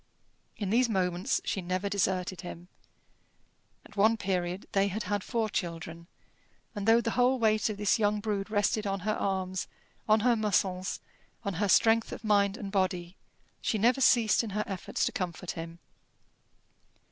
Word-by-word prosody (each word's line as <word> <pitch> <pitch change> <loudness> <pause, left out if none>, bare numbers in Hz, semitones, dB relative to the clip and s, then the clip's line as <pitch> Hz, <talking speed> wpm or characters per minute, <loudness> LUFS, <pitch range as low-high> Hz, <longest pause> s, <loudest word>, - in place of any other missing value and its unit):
In 200 -3 -3
these 240 +2 +3
moments 185 +3 0
she 195 - -1
never 185 +2 -2
deserted 185 -2 -1
him. 175 0 -9 1.2
At - - -16
one 220 +3 +4
period 185 -2 -2
they 195 0 +2
had 205 +3 -3
had 205 -2 -2
four 230 -2 -1
children, 170 -3 -5 0.7
and 205 -1 -4
though 230 +1 +6
the 230 - -2
whole 250 +2 +3
weight 215 -2 +2
of 210 - -4
this 205 +2 +2
young 210 0 +2
brood 205 -1 -2
rested 210 +1 +1
on 195 -1 -2
her 215 +3 0
arms, 190 -2 -2 0.4
on 215 0 +5
her 240 +1 +4
muscles, 195 -3 0 0.4
on 200 - -1
her 205 - +1
strength 225 +3 +4
of - - -7
mind 205 -1 +2
and 205 -5 -6
body, 185 -2 -1 0.5
she 220 - 0
never 240 +5 +3
ceased 235 -3 +4
in 225 - -4
her 210 - +1
efforts 190 -2 -2
to - - -1
comfort 180 -1 -4
him. 165 0 -7
200 Hz, 165 wpm, -29 LUFS, 185-220 Hz, 1.2 s, though